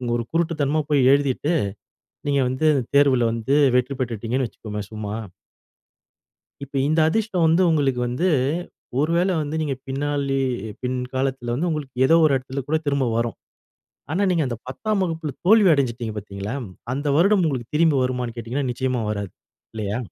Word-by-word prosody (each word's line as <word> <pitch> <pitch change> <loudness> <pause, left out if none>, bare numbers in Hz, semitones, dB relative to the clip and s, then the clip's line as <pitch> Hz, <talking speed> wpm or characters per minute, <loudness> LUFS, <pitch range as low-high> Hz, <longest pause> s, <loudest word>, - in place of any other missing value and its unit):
ஒரு 120 - -1
குருட்டுத்தனமா 155 -3 +1
போய் 145 -2 +3
எழுதிட்டு, 140 +3 +1 0.7
நீங்க 140 -1 +2
வந்து 130 +5 0 0.3
தேர்வில 135 -4 +5
வந்து 115 +4 0 0.2
வெற்றி 125 +2 +2
பெற்றுட்டீங்கன்னு 120 +1 -1
வச்சுக்கோங்க. 105 -2 -7
சும்மா. 105 -1 -5 1.5
இப்ப 140 0 -10
இந்த 155 +1 +2
அதிர்ஷ்டம் 195 -2 +1
வந்து 165 +3 +4
உங்களுக்கு 140 -6 +1
வந்து, 125 +10 0 0.7
ஒரு 155 +3 +1
வேள 185 +2 +2
வந்து 150 +1 -4
நீங்க 145 -3 -1
பின் 135 +1 -3
நாள்லயே 140 -2 0 0.3
பின்காலத்துல 125 0 -2
வந்து 170 +6 -1
உங்களுக்கு 150 -5 -4
எதோ 165 - +5
ஒரு 150 - +3
எடத்துல 130 +1 -5
கூட 160 - +2
திரும்ப 140 -2 +1
வரும். 115 0 -1 0.7
ஆனா, 180 - 0
நீங்க 170 -4 +2
அந்த 120 - -3
10 210 +10 -1
வகுப்பில 160 -4 -3
தோல்வி 210 0 +6
அடஞ்சுட்டீங்க 120 -5 -1
பார்த்தீங்களா, 100 +1 -5 0.4
அந்த 145 +2 -3
வருடம் 195 +1 +4
உங்களுக்கு 130 -2 -4
திரும்பி 155 -2 +4
வருமான்னு 125 -2 -2
கேட்டிங்கன்னா, 125 +4 -3
நிச்சயமா 130 0 -1
வராது. 100 -3 -3 0.4
இல்லையா? 105 -1 -3
135 Hz, 150 wpm, -23 LUFS, 120-155 Hz, 1.5 s, தோல்வி